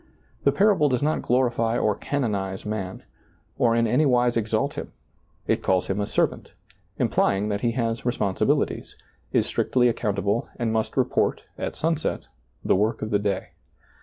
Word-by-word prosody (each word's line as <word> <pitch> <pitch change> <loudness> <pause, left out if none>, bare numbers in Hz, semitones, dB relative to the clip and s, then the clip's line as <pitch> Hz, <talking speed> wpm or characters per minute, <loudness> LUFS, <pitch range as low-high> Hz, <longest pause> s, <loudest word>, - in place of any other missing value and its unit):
The - - +6
parable 195 -7 +3
does 125 0 0
not 155 +1 +1
glorify 120 -2 +1
or 105 - +2
canonize 100 -8 -2
man, 100 -3 -4 0.6
or 115 -2 +3
in 115 0 +3
anywise 125 -1 +3
exalt 115 +5 0
him. - - -6 0.5
It - - +1
calls 95 -1 +1
him 95 +2 0
a 100 - -2
servant, - - -1 0.4
implying 100 +2 +1
that 100 -1 -2
he 115 -1 +1
has 115 -2 -1
responsibilities, 110 -6 0 0.4
is - - +2
strictly 125 -1 +2
accountable 105 -1 -1
and 115 -3 -1
must 110 -1 -1
report, - - +1
at - - -4
sunset, 160 -1 -1 0.4
the - - +4
work 110 +4 0
of 110 - -4
the 105 - +3
day. 100 -1 -2
115 Hz, 155 wpm, -25 LUFS, 105-125 Hz, 0.6 s, The